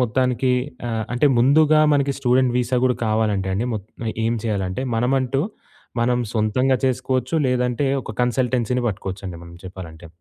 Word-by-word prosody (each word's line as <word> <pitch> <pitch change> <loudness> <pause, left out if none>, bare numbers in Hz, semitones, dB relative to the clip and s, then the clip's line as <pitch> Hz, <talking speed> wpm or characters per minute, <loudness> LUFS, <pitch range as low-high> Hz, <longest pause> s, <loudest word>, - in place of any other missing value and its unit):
మొత్తానికి 125 +1 +1 0.4
ఆహ్, 110 -1 -2
అంటే 125 +4 +3
ముందుగా 155 +5 +5
మనకి 140 -1 +2
స్టూడెంట్ 125 -1 +2
వీసా 125 +1 0
గూడా 125 -1 +2
కావాలంటేండి, 105 -2 0
మొత్ 100 -2 -6 0.2
ఆహ్, 110 - -1
ఏం 115 +1 +1
చేయాలంటే 100 +2 -2
మనమంటూ 130 +3 +1 0.6
మనం 125 +1 +2
సొంతంగా 120 +5 +2
చేసుకోవచ్చు, 130 +1 -1
లేదంటే 125 +2 0 0.2
ఒక 110 - -7
కన్‌సల్‌టె‌న్సీ 125 -1 0
పట్టుకోవచ్చండి 95 -3 -5
మనం 85 0 -12
చెప్పాలంటే. 85 -3 -9
125 Hz, 135 wpm, -21 LUFS, 105-130 Hz, 0.6 s, ముందుగా